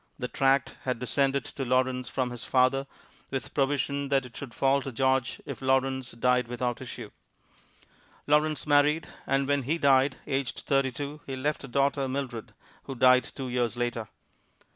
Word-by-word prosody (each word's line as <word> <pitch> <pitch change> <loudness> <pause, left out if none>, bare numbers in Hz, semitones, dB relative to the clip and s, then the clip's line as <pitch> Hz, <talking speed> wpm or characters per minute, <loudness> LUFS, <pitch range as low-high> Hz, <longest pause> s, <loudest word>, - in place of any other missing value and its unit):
The 125 - -3
tract 135 +1 +1
had 125 -2 -2
descended 135 +2 0
to 135 - -5
Lawrence 130 -1 +1
from 125 -2 -1
his 120 -2 -7
father, 130 +1 +2 0.4
with 135 -4 -4
provision 140 0 0
that 135 -1 +1
it 120 - -13
should 135 -4 -7
fall 135 +3 +2
to 135 - -5
George 130 +1 +1
if - - -7
Lawrence 130 -1 +1
died 125 +1 +2
without 120 0 -2
issue. 120 -4 -8 1.1
Lawrence 150 +1 +2
married, 150 +2 +3 0.2
and 135 0 +1
when 145 0 +2
he 145 +6 -1
died, 135 -2 +4
aged 135 -1 -2
thirty 135 -1 +1
two, 145 +3 -6
he 135 - -3
left 145 +3 -2
a - - -9
daughter, 140 +1 +1
Mildred, 130 -4 -5 0.3
who 135 - -6
died 125 +1 +5
two 135 -2 -6
years 120 -1 -1
later. 120 -2 -2
135 Hz, 165 wpm, -28 LUFS, 125-140 Hz, 1.1 s, died